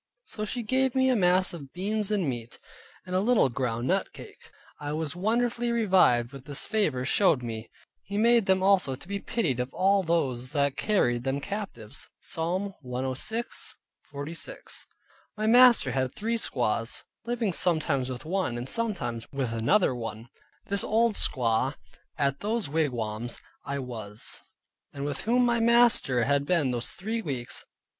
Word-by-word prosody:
So 215 - -4
she 240 +3 -3
gave 260 +3 +1
me 260 0 +4
a - - +3
mess 185 -2 +3
of 140 -5 -9
beans 205 +3 -1
and 200 -6 +1
meat, 120 -3 -5 0.5
and 185 0 -4
a - - +4
little 220 - +3
ground 120 -1 -2
nut - - +1
cake. - - -13 0.3
I 145 0 -4
was 155 -1 -3
wonderfully 235 +5 0
revived 185 - +3
with 135 -1 -10
this 145 -1 -4
favor 180 - 0
showed 140 -4 +3
me: 115 -1 -5 0.3
"He 200 +1 -5
made 230 -1 +4
them 190 0 +3
also 190 -9 +3
to 140 - -13
be 200 +1 -3
pitied 165 - -1
of 125 +1 -2
all 195 +1 +3
those 135 -8 0
that 140 -2 +1
carried 120 - +1
them 135 +1 -1
captives" 145 - -6
(Psalm 185 +4 -3
106.46). 145 - -5 0.5
My 215 - -1
master 240 - +6
had 130 0 -1
three 230 +2 -1
squaws, 115 - -1 0.2
living 235 -5 0
sometimes 155 -7 +1
with 125 +1 -6
one, 175 -8 -1
and 120 +2 -5
sometimes 175 - -2
with 135 -5 -2
another 130 - +3
one, 115 -1 -6 0.4
this 200 0 +1
old 225 +1 +2
squaw, 125 - +2 0.4
at 140 -2 +1
whose 220 -1 -1
wigwam 120 -7 -1 0.4
I 140 - -2
was, 115 -5 -3 0.5
and 140 0 -5
with 145 -1 -4
whom 245 +2 +3
my 235 -1 +2
master 230 - +4
had 140 +2 +2
been 150 -7 +2
those 120 -1 -1
three 225 +4 -3
weeks. 130 - -3
160 Hz, 155 wpm, -28 LUFS, 125-215 Hz, 0.5 s, master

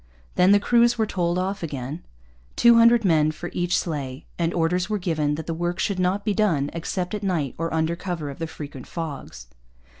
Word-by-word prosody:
Then 180 +2 +4
the 205 - +6
crews 235 +2 +3
were 220 - +2
told 175 -4 -1
off 195 +2 -2
again, 145 0 -5 0.5
two 235 0 +6
hundred 230 -1 +6
men 155 -4 +4
for 175 +3 -6
each 175 0 +1
sleigh, 140 -4 -4
and 165 0 +1
orders 175 +3 0
were 210 - 0
given 155 -6 0
that 160 0 -6
the 165 - -3
work 175 +2 -2
should 195 -1 -1
not 185 +3 0
be 210 - +1
done 170 -10 +1
except 180 +3 -3
at 210 - -3
night 170 -9 -1
or 165 0 -2
under 160 +1 0
cover 170 -5 -4
of 140 - -11
the 165 - -3
frequent 145 -4 -9
fogs. 145 - -6
175 Hz, 205 wpm, -24 LUFS, 155-195 Hz, 0.5 s, the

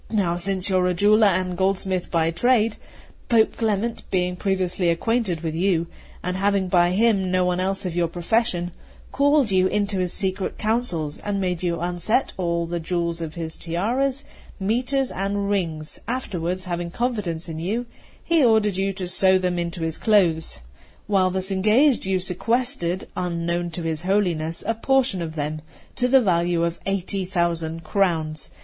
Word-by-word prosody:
Now 190 -6 +1
since 185 +1 0
you 190 -2 +2
are 180 0 +2
a 180 - 0
jeweller 210 +3 +5
and 185 -1 0
goldsmith 190 -1 0
by 165 -1 +1
trade, 225 +4 +2 0.5
Pope 225 -2 +4
Clement, 225 0 -1
being 180 -1 0
previously 185 -2 0
acquainted 190 -1 0
with 160 -2 -3
you, 170 0 +1 0.4
and 180 +1 -2
having 195 -1 +1
by 175 0 +3
him 200 -2 +2
no 185 0 +2
one 180 0 0
else 195 +1 -1
of 175 -2 -3
your 175 -1 +2
profession, 175 +1 0 0.4
called 285 -4 +3
you 185 -1 +4
into 200 -1 0
his 180 -1 0
secret 190 -1 -1
counsels, 215 -10 -1
and 205 -1 -2
made 180 -3 -1
you 170 -2 -1
unset 175 +8 0
all 170 -2 -1
the 170 +1 -3
jewels 170 0 -2
of 160 -1 -5
his 165 -2 -5
tiaras, 245 +11 -1 0.4
mitres, 250 +6 0
and 200 +1 -2
rings; 160 -6 -2
afterwards, 185 -7 -3
having 175 -1 -3
confidence 195 -7 -2
in 160 -1 -5
you, 215 +9 -2 0.4
he 330 -3 +3
ordered 220 -5 +3
you 195 0 0
to 185 -1 -4
sew 185 +1 +4
them 180 -1 -1
into 170 -1 -3
his 160 -1 -3
clothes. 175 - +2 0.4
While 195 -3 +2
thus 190 +1 -2
engaged, 215 +6 +3
you 190 -1 +1
sequestered, 190 0 -1
unknown 175 -1 -2
to 170 +1 -6
his 160 -2 -2
Holiness, 175 -4 0
a 225 - +1
portion 255 -4 +1
of 160 -1 -5
them, 155 0 -3 0.3
to 250 - +1
the 265 +1 +5
value 175 -4 +1
of 170 0 -2
eighty 195 0 -1
thousand 170 -3 -1
crowns. 160 -4 0
185 Hz, 170 wpm, -23 LUFS, 170-210 Hz, 0.5 s, jeweller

